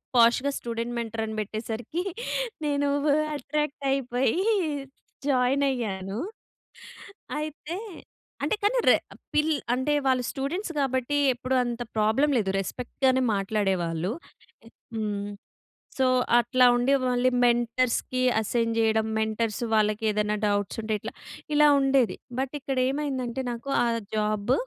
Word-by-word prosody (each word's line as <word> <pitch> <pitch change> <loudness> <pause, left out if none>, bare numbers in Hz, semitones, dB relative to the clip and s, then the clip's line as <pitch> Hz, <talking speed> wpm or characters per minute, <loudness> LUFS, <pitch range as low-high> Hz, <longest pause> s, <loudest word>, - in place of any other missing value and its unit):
పాష్‌గా 240 +4 +5
student 235 0 -4
mentor 225 -1 -3
అని 220 0 -5
పెట్టేసరికి 220 - -4 0.6
నేను 285 -1 +1 0.2
వు 295 - +3 0.2
అట్రాక్ట్ 295 +1 -3
అయిపోయి 260 -1 +1 0.9
జాయిన్ 265 0 +2
అయ్యాను. 200 -5 -3 1.2
అయితే 310 +3 -5 0.7
అంటే - - +1
కానీ 420 +5 +3
రె - - +8 0.4
పిల్ 305 +1 +3 0.2
అంటే 260 +4 0
వాళ్ళు 255 -1 +2
స్టూడెంట్స్ 330 +8 -3
కాబట్టి 265 +1 0 0.2
ఎప్పుడు 255 +2 -2
అంత 240 0 -4 0.2
ప్రాబ్లమ్ 220 +8 +3
లేదు. 195 -4 0
రెస్పెక్ట్‌గానే 260 +5 0
మాట్లాడేవాళ్ళు. 190 -3 0 0.8
హ్మ్. 205 -2 -2 0.7
సో 260 - +4 0.3
అట్లా 250 +2 +3
ఉండి 245 +3 +3 0.2
మళ్ళీ 250 +1 +2 0.2
మెంటర్స్‌కి 240 +1 +1 0.2
అసైన్ 230 +1 0
జేయడం, 220 -1 +2
మెంటర్స్ 220 +1 -1
వాళ్ళకి 215 0 +2
ఏదైనా 210 0 0
డౌట్స్ 205 0 -1
ఉంటే 220 0 -1
ఇట్లా 220 - -6 0.4
ఇలా 300 0 +7
ఉండేది. 270 -3 +2 0.2
బట్ 265 +1 -3
ఇక్కడ 270 -1 -2
ఏమైందంటే? 265 -3 -2
నాకు 235 +4 -6
ఆ - - +1 0.3
జాబ్ 210 +1 0
240 Hz, 115 wpm, -26 LUFS, 220-270 Hz, 1.2 s, రె